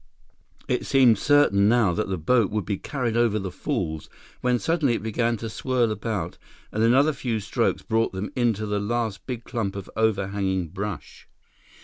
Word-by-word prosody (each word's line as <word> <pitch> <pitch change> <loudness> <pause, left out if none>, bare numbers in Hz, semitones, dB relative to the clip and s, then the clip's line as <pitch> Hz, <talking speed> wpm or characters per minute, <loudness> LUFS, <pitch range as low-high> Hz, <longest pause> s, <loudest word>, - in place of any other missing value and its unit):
It - - 0
seemed 125 -6 +4
certain 120 -9 +4
now 115 -6 +3
that 105 +2 -2
the 95 - -1
boat 110 +6 +2
would 105 -3 -2
be 100 -2 -2
carried 125 -5 -2
over 115 -2 +2
the 95 -3 -4
falls, 90 - -3 0.3
when 125 -1 +2
suddenly 150 -3 +1
it 105 - -4
began 115 +1 0
to 115 - -5
swirl 120 +1 0
about, 105 -5 -3 0.3
and 110 - -2
another 135 +7 +4
few 120 -5 -2
strokes 110 +3 -1
brought 115 0 +1
them 95 +2 -5
into 115 -4 +1
the 105 -1 -1
last 110 -1 -2
big 120 -3 -4
clump 110 -7 -3
of 100 -2 -7
overhanging 100 -4 0
brush. 100 +2 -6
110 Hz, 170 wpm, -25 LUFS, 100-120 Hz, 0.3 s, seemed